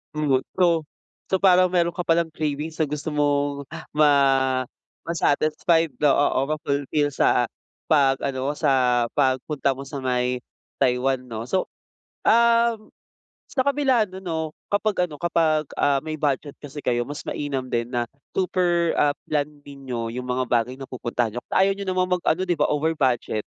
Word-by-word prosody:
Umuwi 140 -4 +2 0.2
so 170 -3 +3 0.5
so 190 - +2
parang 185 -1 +5
meron 175 -1 +1
ka 180 - -3
palang 165 -1 +1
cravings 155 +1 -3
na 150 - +1
gusto 150 +1 -4
mong, 145 -1 0
ah, - - -8
ma 150 0 +5 1.0
ma-satisfy 165 +1 +2 0.2
oo, 145 - +5
oo, 135 -1 +3
ma-fulfill 145 -1 -1
sa 120 - +3 0.4
pag-ano 135 -2 +1
mo, - - -1
sa 125 -5 +3
pagpunta 135 0 0
mo 135 - -7
sa 140 -1 -6
may 125 -1 0 0.4
Taiwan, 130 0 +2
'no. 115 0 -5
So, 185 +8 -1 0.6
um, 235 -1 +3 0.5
sa 260 - -1
kabila 260 -6 +2
nun 190 0 -10
'no, 165 -2 -2 0.3
kapag 205 -3 +1
ano 150 -2 -11
kapag, 160 -3 +1
ah, 140 -1 +2
may 155 0 -5
budget 145 -1 -2
kasi 145 0 -9
kayo, 120 0 0
mas 145 +1 -6
mainam 135 -3 -4
din 120 +1 -2
na 120 -1 -1 0.2
super, 175 -2 +1
ah, 145 -1 +3 0.2
planned 150 -1 -2
ninyo 130 -5 -6
yung 125 +2 -5
mga 125 0 -2
bagay 120 +1 +1
na 135 0 -10
pupuntahan 120 -2 -2
n'yo. - - -3
Kasi - - -6
ayaw 195 - +2
n'yo 200 - -5
namang 185 -1 +1
mag-ano, 175 +1 0
'di 175 - +2
ba, 150 - +3
over 155 +2 0
budget, 120 -5 0
145 Hz, 165 wpm, -24 LUFS, 130-170 Hz, 1.0 s, parang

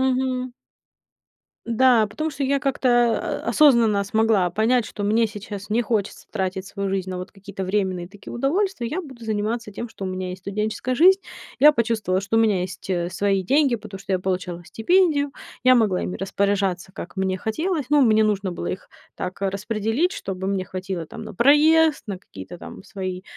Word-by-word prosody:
Мгм. 255 -1 0 1.1
Да, 235 -1 +4
потому 265 +10 -3
что 280 -1 -3
я 275 +1 +1
как-то, 240 -3 +1
а, - - -3
осознанно 235 -9 +4
смогла 215 -3 +2
понять, 225 +6 +2
что 205 - -7
мне 220 +3 +3
сейчас 205 -1 -8
не 225 +3 +2
хочется 220 -4 -2
тратить 190 -2 -3
свою 200 0 -3
жизнь 190 -1 -2
на 185 - -4
вот 180 +1 -7
какие-то 195 -1 -7
временные 185 -2 -1
такие 200 +2 -11
удовольствия. 280 - 0
Я 310 +10 -2
буду 265 -9 -11
заниматься 215 0 -2
тем, 235 +4 -5
что 220 -3 -8
у - - -2
меня 185 0 -4
есть 180 0 -7
студенческая 215 +5 -2
жизнь. 375 +8 +6 0.4
Я 300 +2 +8
почувствовала, 220 -7 0
что 200 +3 -1
у - - +5
меня 210 -5 +3
есть, 185 +1 -6
э, 175 -2 0
свои 195 +1 0
деньги, 275 +4 +3
потому 200 -3 -9
что 195 - -5
я 185 - +2
получала 180 -2 -3
стипендию, 285 - +2 0.3
я 255 0 +6
могла 215 -7 +2
ими 180 - -3
распоряжаться, 195 -1 -1
как 185 0 -9
мне 190 0 -1
хотелось. 310 - -2
Ну, 295 0 +5
мне 220 -3 +4
нужно 200 -3 0
было 175 - -5
их 190 - -5 0.2
так 180 +1 -5
распределить, 215 - -1
чтобы 190 -1 -5
мне 195 -1 -1
хватило 185 -2 -5
там - - -9
на - - -8
проезд, 305 +5 +5
на 195 -3 -4
какие-то 140 - -11
там - - -10
свои, 185 -2 -5
210 Hz, 185 wpm, -23 LUFS, 190-250 Hz, 1.1 s, Я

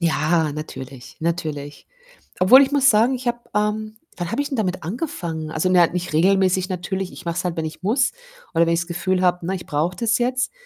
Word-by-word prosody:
Ja, 160 -1 +1
natürlich, 135 -4 -8
natürlich. 155 -4 -4 0.5
Obwohl 245 +9 +8
ich 275 0 +2
muss 280 -1 +5
sagen, 225 +4 +4
ich 255 0 -6
habe, 240 0 0 0.2
ähm 215 +1 -1 0.2
wann 175 -1 -3
habe 255 - 0
ich 285 - -6
denn 270 - -2
damit 185 -6 -1
angefangen? 170 - -4
Also, 155 +4 0
na 175 -2 +6
ja, - - -13
nicht 180 -2 -4
regelmäßig 185 +2 +3
natürlich. 185 +1 -3
Ich 185 - -12
mache 170 0 -2
es - - -2
halt, 175 -1 -3
wenn 160 - -1
ich 155 0 -7
muss, 230 +8 +2 0.4
oder 165 0 +3
wenn 170 - +2
ich's 170 +1 -1
Gefühl 185 +1 -1
habe, 180 -1 +2
ne, 190 +2 -1
ich 180 - -7
brauche 160 +4 -1
das 230 +4 +1
jetzt. 255 - 0
180 Hz, 220 wpm, -22 LUFS, 165-215 Hz, 0.5 s, Obwohl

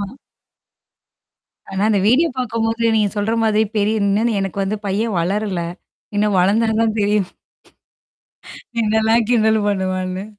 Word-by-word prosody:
ஆமா. - - -2 1.7
ஆனா, 190 0 -2
அந்த 210 -2 +2
வீடியோ 295 +9 +4
பார்க்கும்போது 230 -1 0
நீங்க 210 -2 +2
சொல்ற 205 +2 0
மாதிரி 220 0 +2
பெரியனந்து 210 +2 +1
எனக்கு 195 0 -4
வந்து 200 +2 -2
பையன் 205 +1 -1
வளரல. 190 0 -1 0.5
இன்னும் 205 -1 +1
வளர்ந்தா 210 +5 +2
தான் 225 -1 0
தெரியும். 205 -2 +1 1.6
என்னல்லாம் 220 +1 +2
கிண்டல் 225 -3 +3
என்னல 220 -1 +1
பண்ணுவான்னு! 185 -1 -2
210 Hz, 120 wpm, -19 LUFS, 195-225 Hz, 1.7 s, வீடியோ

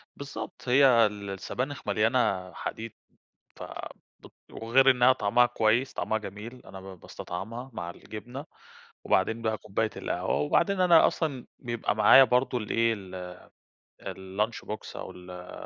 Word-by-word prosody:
بالضبط 125 -3 -7
هي 125 -3 +6
ال 100 -1 -4
السبانخ 125 +8 -5
مليانة 105 -3 +1
حديد، 115 +4 -6 0.6
ف - - -8 0.6
بت - - -16 0.2
وغير 130 +4 +4
إنها 125 0 +5
طعمها 115 +2 +3
كويس، 115 +2 +1
طعمها 110 - -1
جميل 105 +4 -9
أنا 95 - -10
ب 95 -1 -11
باستطعمها 115 +13 -7
مع 85 -5 -5
الجبنة، 120 - -9 0.6
وبعدين 110 +5 +1
بقى 110 -1 0
كوباية 105 +2 -2
القهوة 90 +2 -2
وبعدين 185 +6 +1
أنا 175 -3 +6
أصلًا 140 -7 -3
بيبقى 120 -4 -2
معايا 110 +5 +8
برضو 125 0 +1
الإيه، 115 +1 +1
ال 90 -3 -8 0.7
الlunch 95 +4 -4
box 105 - -6
أو - - -7
ال 90 0 -11
110 Hz, 135 wpm, -28 LUFS, 100-125 Hz, 0.7 s, معايا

